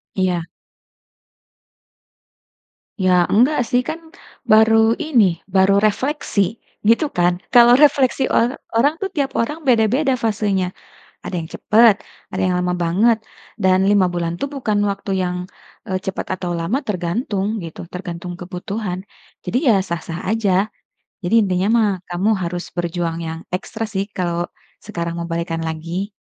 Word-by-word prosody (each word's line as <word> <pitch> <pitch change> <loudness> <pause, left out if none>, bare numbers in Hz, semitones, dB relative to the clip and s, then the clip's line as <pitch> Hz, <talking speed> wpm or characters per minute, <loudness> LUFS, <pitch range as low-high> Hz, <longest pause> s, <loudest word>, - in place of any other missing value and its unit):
Iya. 185 -3 +1 2.6
Ya 180 -1 +4
enggak 250 +5 +4
sih. 245 +2 +1
Kan 325 0 -6 0.3
baru 220 +1 +5
ini, 230 - +2
baru 195 +1 +4
refleksi. 215 - 0 0.2
Gitu 230 +8 +3
kan? 175 0 +2 0.2
Kalau 240 +1 +8
refleksi 275 -3 +4
or 240 +3 +1 0.2
orang 285 +8 +2
tuh, 390 - -1
tiap 280 -4 -1
orang 300 +8 -2
beda-beda 255 +2 +2
fasenya. 205 -5 0 0.5
Ada - - -5
yang 160 - -7
cepet, 225 0 +5 0.4
ada - - -3
yang 180 - +1
lama 180 0 0
banget. 215 +7 +3 0.4
Dan 185 -2 +3
5 200 -2 +4
bulan 170 -1 -2
tuh - - 0
bukan 215 -7 -1
waktu 200 0 -5
yang, 180 0 -2 0.5
eee, 190 -1 0
cepet 190 0 -4
atau 180 -1 -4
lama, 170 +10 -1
tergantung 200 +2 -2
gitu 165 - -8
tergantung 180 -1 -6
kebutuhan. 185 +1 -4 0.5
Jadi - - -2
ya 230 - +6
sah-sah 170 -2 -5
aja. 210 -2 +1 0.5
Jadi 175 - -2
intinya 185 0 0
mah 220 -2 +3 0.2
kamu 180 +4 0
harus 175 0 -3
berjuang 170 -1 -2
yang 160 0 -5 0.2
ekstra 220 +4 -5
sih 195 0 -1
kalau 175 -2 -1 0.5
sekarang 170 0 -4
mau 170 - -4
balikan 165 0 -2
lagi. 170 +5 -4
195 Hz, 135 wpm, -20 LUFS, 175-230 Hz, 2.6 s, Kalau